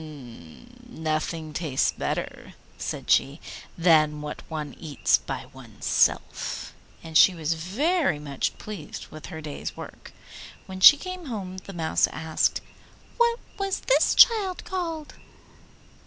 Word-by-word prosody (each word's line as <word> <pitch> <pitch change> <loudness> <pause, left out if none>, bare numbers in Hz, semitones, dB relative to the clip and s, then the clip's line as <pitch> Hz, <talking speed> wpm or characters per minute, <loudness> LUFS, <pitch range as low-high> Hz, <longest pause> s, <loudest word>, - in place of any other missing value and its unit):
'Nothing 155 -2 -3
tastes 150 -5 0
better,' - - -5 0.2
said - - -5
she, 140 +4 +3 0.4
'than 155 -3 +4
what 150 - -6
one 155 -2 -5
eats 150 -4 +1
by - - -6
oneself,' - - -1 0.3
and 160 -1 -10
she 180 +3 +7
was 160 -1 -1
very 245 - 0
much 145 -2 -3
pleased 205 -8 -8
with 155 - -9
her 160 -3 -7
day's 150 -2 -6
work. - - -10 0.5
When 190 0 -8
she 290 +9 +10
came 370 0 -7
home 190 -6 -5
the 195 - -11
Mouse 165 -2 +1
asked, 160 -1 -1 0.6
'What 470 0 +3 0.2
was 390 -1 -1
this - - +3
child 410 -6 +5
called? 330 -5 -4
170 Hz, 125 wpm, -26 LUFS, -, 0.6 s, she